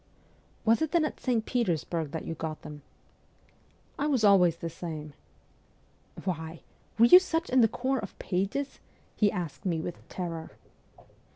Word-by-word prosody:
' - - -34
Was 230 +5 +4
it 315 0 -1
then 335 -3 +4
at - - -5
St. 235 -4 0
Petersburg 170 - -1
that 160 +1 -5
you - - -3
got 160 -1 -5
them? 150 -1 -9 0.4
' - - -35
' - - -28
I 290 - +1
was 265 -7 +1
always 185 -5 +6
the 170 - -5
same.' 155 -3 -6 0.6
' - - -18
Why! 160 -3 -4 0.4
Were 230 - +7
you 360 +10 +10
such 340 -4 -2
in 255 0 +5
the 225 - +6
corps 260 +4 -1
of 200 - -8
pages? 200 +10 -2 0.2
' - - -35
he 205 -2 +3
asked 175 -4 -5
me 175 -5 0
with 170 +2 -7
terror. 170 -3 -5
190 Hz, 180 wpm, -29 LUFS, 165-250 Hz, 0.6 s, you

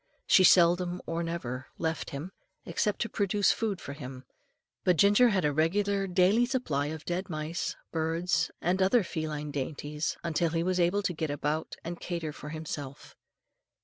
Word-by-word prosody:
She 190 - +6
seldom 175 0 +5
or 165 +1 -2
never 130 -7 -4
left 160 -1 -2
him, 145 +7 -6 0.3
except 210 -1 -1
to - - -3
procure 205 0 -1
food 205 -2 +2
for 140 - -7
him; 130 -3 -8 0.6
but 180 -2 +3
Ginger 205 +7 +6
had 190 -6 +1
a 145 - +2
regular 195 +6 +1
daily 190 +6 +3
supply 160 - -1
of 155 0 -6
dead 180 +3 -2
mice, 155 +1 -3 0.2
birds, 165 +2 0
and 185 +3 +1
other 195 +4 +4
feline 155 -3 -4
dainties, 150 +2 -3
until 170 0 +1
he 165 +1 0
was 185 0 0
able 180 +4 +2
to 185 - 0
get 160 -1 -3
about 150 +2 -2
and 170 +1 -5
cater 170 -4 -4
for 150 - -9
himself. 150 -3 -7
170 Hz, 165 wpm, -29 LUFS, 150-185 Hz, 0.6 s, She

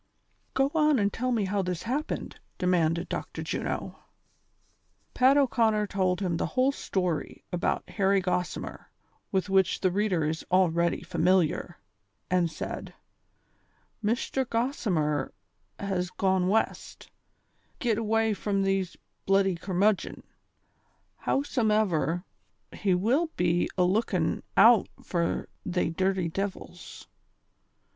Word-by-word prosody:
" - - -43
Go 270 +1 +2
on 305 -3 +4
and 205 -2 +1
tell 255 +2 -1
me 225 -4 +1
how 200 +1 0
this 180 -2 -3
happened," 275 +6 -3 0.2
demanded 170 -2 +1
Dr. - - -5
Juno. - - -4 1.1
Pat 260 +3 +5
O 285 - +5
'Conner 220 -4 +2
told 185 -2 0
him 175 -4 0
the - - -1
whole 260 +2 +4
story 180 - -3
about 175 - -1
Harry 195 -1 +2
Gossimer, 180 -1 -3 0.5
with 190 0 0
which 190 -2 +2
the 185 - +2
reader 190 -5 +1
is 160 +1 -2
already 170 -2 +2
familiar, 175 -1 +1 0.5
and 180 -2 +3
said: - - -6 1.1
"Mishter 240 +4 0
Gossimer 225 - -1 0.4
has 185 -3 -2
gone 190 -1 +1
West, 220 +4 -1
to - - -15 0.7
git 230 -3 0
away 225 0 +1
from 200 0 -1
these 195 -2 -1 0.3
bluddy 195 -1 +3
curmudgon; 190 +3 0 1.0
howsomever, 210 - +1 0.5
he 190 -3 +1
will 245 - +2
be 175 0 +1
alookin' 180 -3 +1 0.2
out 225 +1 +7 0.2
fur 170 -2 -1 0.2
they 180 -2 -1
dirty 190 0 0
divils. 195 +3 -6
190 Hz, 115 wpm, -28 LUFS, 180-220 Hz, 1.1 s, out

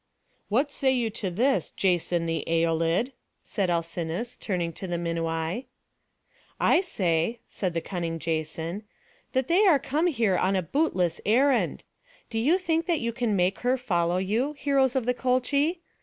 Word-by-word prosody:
"What 265 +7 +1
say 270 -2 +1
you 240 -4 0
to 205 -3 -3
this, 250 +10 +1
Jason 175 -2 +1
the 165 -1 -1
Æolid?" 165 +7 +1 0.3
said 195 -4 -1
Alcinous, 170 +6 -2
turning 175 -4 -2
to 190 - -7
the 175 - -2
Minuai. 165 +5 -2 0.9
"I 345 - +4
say," 185 - 0
said 180 -4 -3
the 165 - 0
cunning 170 -3 -3
Jason, 160 +3 -3 0.5
"that 260 -1 +1
they 380 +6 +4
are 330 -6 +6
come 295 +5 0
here 230 - +2
on 190 +1 +2
a 185 - +1
bootless 185 - 0
errand. 260 +5 +2 0.5
Do 225 - -1
you 300 +11 +3
think 335 -2 -1
that 340 -4 +1
you 235 0 -2
can 235 -3 0
make 185 +1 +1
her 250 +1 +1
follow 175 -8 0
you, 220 +10 0
heroes 275 -2 +1
of 260 -3 +1
the 250 - +2
Colchi? 280 +7 +1
210 Hz, 160 wpm, -27 LUFS, 170-265 Hz, 0.9 s, are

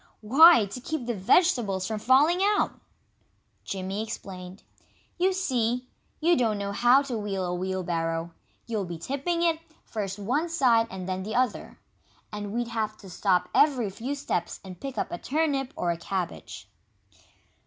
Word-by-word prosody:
"Why, 270 +3 +7
to 200 +6 -8
keep 305 -1 -4
the 240 - -1
vegetables 205 - +2
from 220 +1 -3
falling 280 +10 +4
out!" 410 +1 +1 0.8
Jimmy 195 +1 -4
explained. 190 -3 -8 0.6
"You 370 +2 +3
see, 250 -9 -1 0.3
you 340 +2 +4
don't 225 -7 +1
know 200 0 -3
how 245 +6 +5
to 250 -5 -3
wheel 195 -3 -2
a 175 - -2
wheelbarrow. 170 -2 -2 0.3
You'll 215 -4 -2
be 170 -1 -6
tipping 280 - -2
it, 330 -2 +2 0.3
first 200 -3 -4
one 255 +12 -1
side 240 -8 +3
and 185 -1 -7
then 185 0 -2
the 215 +3 -5
other. 250 -3 -1 0.6
And 205 -1 -5
we'd 235 +1 -2
have 215 -2 -2
to 190 -3 -12
stop 185 0 +1
every 255 -9 +3
few 250 +8 -4
steps 180 -11 -3
and 185 -2 -10
pick 270 -1 -6
up - - -2
a 175 - -4
turnip 280 -3 0
or 175 - 0
a 170 - -3
cabbage." 185 +1 -5
220 Hz, 160 wpm, -27 LUFS, 190-275 Hz, 0.8 s, Why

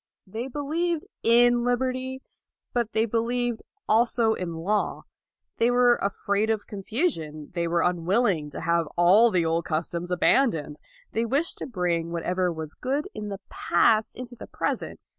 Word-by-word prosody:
They 225 +6 -5
believed 315 +5 -2 0.2
in 240 +1 +4
liberty, 255 +1 -1 0.5
but 235 -2 0
they 220 +1 +3
believed 235 +1 -1 0.3
also 230 0 +3
in 175 -5 -4
law. 200 +6 -1 0.5
They 230 - +3
were 245 0 +4
afraid 200 +2 -1
of 220 -2 0
confusion. 195 - -3
They 170 -1 -1
were 170 0 +1
unwilling 180 -1 +1
to - - -7
have 170 -1 +1
all 190 +7 +6
the 180 -5 +1
old 165 +1 0
customs 170 +2 -3
abandoned. 175 - +2 0.3
They 225 - 0
wished 280 +8 -1
to - - -5
bring 175 -7 -1
what 170 -1 -3
ever 180 0 0
was 160 -2 -6
good 275 +4 -2
in 210 -1 -6
the 200 -1 -6
past 215 +5 +2
into 245 0 -8
the - - -10
present. - - -3
215 Hz, 155 wpm, -26 LUFS, 170-245 Hz, 0.5 s, all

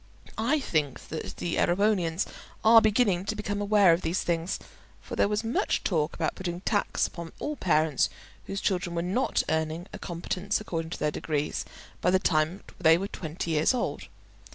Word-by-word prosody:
I 265 +8 +2
think 155 - -2
that 160 - -5
the 170 - -2
Erewhonians 180 -2 +2 0.4
are 225 +1 +8
beginning 210 -4 +3
to 215 - -2
become 205 -1 -3
aware 205 -4 +5
of 165 - 0
these 165 +2 -1
things, 170 +2 -1 0.4
for - - -7
there - - +3
was 210 +2 -1
much 225 +2 0
talk 160 -3 0
about - - -1
putting 175 -2 -4
a - - -7
tax 205 0 +1
upon 170 -1 -7
all 300 - -3
parents 155 - +2 0.4
whose 195 0 -3
children 180 -3 0
were 170 - 0
not 200 +9 +1
earning 160 +2 -1
a - - -7
competence 180 +3 -2
according 165 -6 -4
to - - -5
their 150 - 0
degrees 150 -1 -2 0.4
by - - +3
the 190 - +5
time 165 0 +1 0.2
they 160 +1 +6
were 195 +3 -3
twenty 165 0 -4
years 155 +10 +3
old. 245 - -3
180 Hz, 180 wpm, -28 LUFS, 165-205 Hz, 0.4 s, are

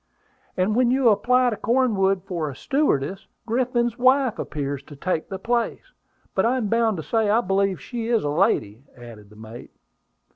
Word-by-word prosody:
"And 190 +4 +1
when 250 0 +3
you 255 -1 +3
apply 245 +4 +3
to - - -2
Cornwood 205 -5 +1
for 170 -6 -3
a 135 - -8
stewardess, 195 - -1 0.2
Griffin's 240 0 0
wife 255 -2 +3
appears 140 -2 -4
to 145 - -12
take 160 +2 -3
the 190 - -4
place. 235 - -2 0.4
But - - +1
I 245 +3 +2
am 220 -5 -2
bound 230 -2 +1
to 160 - -5
say 220 +2 0
I 220 +3 +4
believe 195 -2 0
she 235 -2 -5
is 230 -2 +1
a 145 - -1
lady," 125 - 0
added 115 -4 -12
the 105 - -17
mate. 110 +2 -11
210 Hz, 180 wpm, -23 LUFS, 155-240 Hz, 0.4 s, I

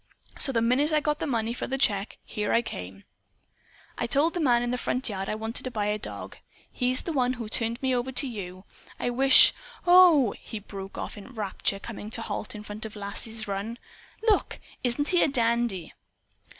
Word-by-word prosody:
So 275 - +3
the 230 -3 +1
minute 265 +6 +2
I 305 - +4
got 300 0 -1
the - - -2
money 230 -3 -1
for - - -4
the 270 - -2
check, 205 -6 +1 0.2
I 210 +2 +2
came 90 - -6
here. 95 - -18 1.0
I 235 - 0
told 290 +7 +3
the 355 - -2
man 245 -6 +3
in 245 - -1
the 250 - -1
front 255 +2 -1
yard 195 -3 -3
I - - -1
wanted 220 +2 -2
to 255 - -3
buy 215 -4 -2
a 210 +1 0
dog. - - -7 0.3
He's 255 0 +1
the 335 - -3
one 255 -3 +1
who 235 -3 -6
turned 230 +2 +1
me 260 -1 +2
over 250 +1 -1
to 260 +3 -1
you. 190 -5 -7 0.3
I 245 - -1
wish 265 +2 +7 0.3
OH!" 350 - +7
he 220 - -7
broke 195 -1 -9
off - - -5
in 205 - -12
rapture, 205 -3 -2
coming 210 0 -8
to 225 - -1
a - - -4
halt 210 0 -5
in 210 - -8
front 210 +1 -8
of 220 -1 -7
Lass's 215 +2 -5
run. 200 +4 -4 0.5
"Look! 440 -3 +1 0.2
Isn't 260 +4 0
he 355 - +3
a - - +4
dandy?" 235 - 0
235 Hz, 210 wpm, -27 LUFS, 210-260 Hz, 1.0 s, wish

